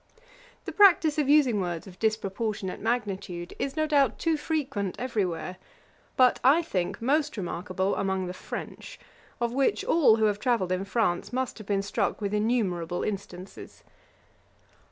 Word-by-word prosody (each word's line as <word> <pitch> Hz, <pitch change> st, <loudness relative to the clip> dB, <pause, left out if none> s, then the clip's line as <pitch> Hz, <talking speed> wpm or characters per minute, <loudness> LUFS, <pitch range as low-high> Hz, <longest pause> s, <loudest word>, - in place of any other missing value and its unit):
The -, -, -4 dB
practice 345 Hz, -7 st, +5 dB
of 285 Hz, -2 st, +1 dB
using 265 Hz, -8 st, +4 dB
words 175 Hz, -2 st, -3 dB
of 185 Hz, -2 st, -13 dB
disproportionate 215 Hz, -2 st, -2 dB
magnitude, 195 Hz, -6 st, -3 dB
is, 275 Hz, 0 st, -2 dB
no 310 Hz, -, +2 dB
doubt, 280 Hz, -6 st, +2 dB
too 330 Hz, -1 st, +1 dB
frequent 275 Hz, -, -2 dB
every 220 Hz, -4 st, -1 dB
where; 175 Hz, +2 st, -5 dB, 0.6 s
but, 255 Hz, -1 st, +5 dB
I 290 Hz, +7 st, +5 dB
think, 180 Hz, -, -2 dB
most 285 Hz, +1 st, +1 dB
remarkable 185 Hz, +1 st, -2 dB
among 190 Hz, -1 st, -1 dB
the 180 Hz, -, -5 dB
French, 185 Hz, -, -8 dB, 0.4 s
of 235 Hz, 0 st, -1 dB
which, 275 Hz, +10 st, +1 dB
all 325 Hz, -, +5 dB
who 220 Hz, -1 st, +2 dB
have 205 Hz, -1 st, +1 dB
travelled 230 Hz, -7 st, 0 dB
in 185 Hz, +1 st, -1 dB
France 200 Hz, -4 st, 0 dB
must 255 Hz, -1 st, -3 dB
have 215 Hz, -, -11 dB
been 195 Hz, -1 st, 0 dB
struck 200 Hz, 0 st, -1 dB
with 205 Hz, -1 st, -3 dB
innumerable 195 Hz, -6 st, 0 dB
instances. 195 Hz, -2 st, -7 dB
215 Hz, 155 wpm, -27 LUFS, 190-260 Hz, 0.6 s, practice